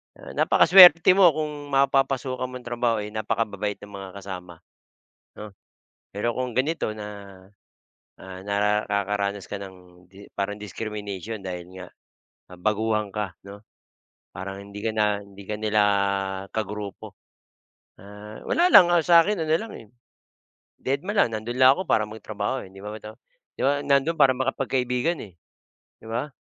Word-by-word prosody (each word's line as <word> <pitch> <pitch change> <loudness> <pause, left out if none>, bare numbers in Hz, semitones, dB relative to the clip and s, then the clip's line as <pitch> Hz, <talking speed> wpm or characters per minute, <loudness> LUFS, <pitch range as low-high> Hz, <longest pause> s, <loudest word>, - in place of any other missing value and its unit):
Ah, - - -11
napakaswerte 175 -2 +7
mo 185 -1 +6
kung 150 -2 -4
mapapasukan 135 -2 +1
mong 125 -1 -9
trabaho 120 -3 -1
ay 105 - -7
napakababait 105 -1 -2
ng 105 - -11
mga 95 -1 -8
kasama 90 -3 -9 0.7
'no? 105 0 -9 0.6
Pero 115 +3 -2
kung 125 -2 -3
ganito 130 -3 -1
na' 100 -3 -10 0.7
ah, 95 0 -10
nara 105 +1 +1
kakaranas 100 -1 -1
ka - - -7
ng 90 -3 -11
'di 100 +1 -14
para 100 0 -2
ng 105 - -7
discrimination 105 0 -6
dahil 90 -3 -6 0.2
nga, 90 - -8 0.6
ah, 90 - -12
baguhan 105 +2 -1
ka, 105 -4 -4
'no? 100 +1 -11 0.7
Parang, 95 +1 -6
hindi 100 0 -9
ka 115 - -1
na 105 -2 0
hindi 100 0 -14
ka 105 - -4
nila 110 -1 +2 0.7
ka 110 -2 -2
grupo. 105 -1 -8 0.9
Ah, 105 +2 -11
wala 355 +2 +3
lang, 180 -3 +9
ang 175 -3 +3
sa 170 -1 +7
akin 190 -1 0
ano 155 - -1
lang, 225 - -8
eh, 115 - -12 1.0
deadma 145 +10 -2
lang, 120 - +2
nando'n 120 +4 -4
lang 130 +2 +7
ako - - -2
para 110 -8 +1
magtrabaho, 110 +4 -4
eh, 95 - -16
'di 95 - -12
ba 105 - -7
ito? 110 0 -10 0.4
'Di - - -9
man 145 +1 +1
nandoon 140 +4 +2
para 130 - +5
makapagkaibigan, 130 +3 -1
eh, 90 -5 -12 0.7
'di 110 - -10
ba? 125 +5 -3
110 Hz, 155 wpm, -24 LUFS, 100-135 Hz, 1.0 s, lang